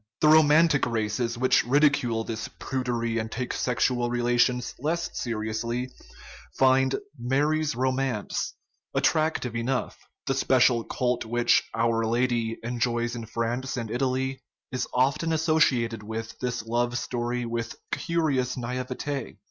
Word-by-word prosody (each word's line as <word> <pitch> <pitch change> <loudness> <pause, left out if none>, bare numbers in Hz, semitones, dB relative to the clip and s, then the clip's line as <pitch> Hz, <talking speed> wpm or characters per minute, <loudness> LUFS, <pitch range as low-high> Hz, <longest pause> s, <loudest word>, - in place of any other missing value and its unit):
The 155 - +5
Romantic 155 -1 +5
races, 115 +1 -1
which 130 +2 +3
ridicule 125 -4 +2
this 110 0 -4
prudery 120 -3 -2
and 110 0 -4
take 125 +1 -3
sexual 120 0 0
relations 120 +1 +1
less 165 +5 -1
seriously, 115 +2 -3 0.7
find 130 0 +4 0.2
Mary's 145 +4 +1
Ro 130 +2 +1
mance 130 -5 -2 0.4
attractive 155 -7 +1
enough; 125 +3 -2 0.3
the 135 - +1
special 125 -3 +3
cult 125 +1 -1
which 120 +1 +3
" - - -10
Our 115 0 +1
Lady 115 0 0
" - - -28
enjoys 120 0 -1
in 115 -2 -6
France 120 +4 -2
and 115 -3 -4
Italy 130 +1 -1 0.3
is 130 - -2
often 140 +6 +1
associated 150 -8 +2
with 110 +1 -6
this 125 -3 -3
love 120 +1 0
story 120 0 -2
with 115 0 -3 0.2
curious 140 -7 0
naivete". 130 +2 -4
125 Hz, 130 wpm, -26 LUFS, 115-135 Hz, 0.7 s, The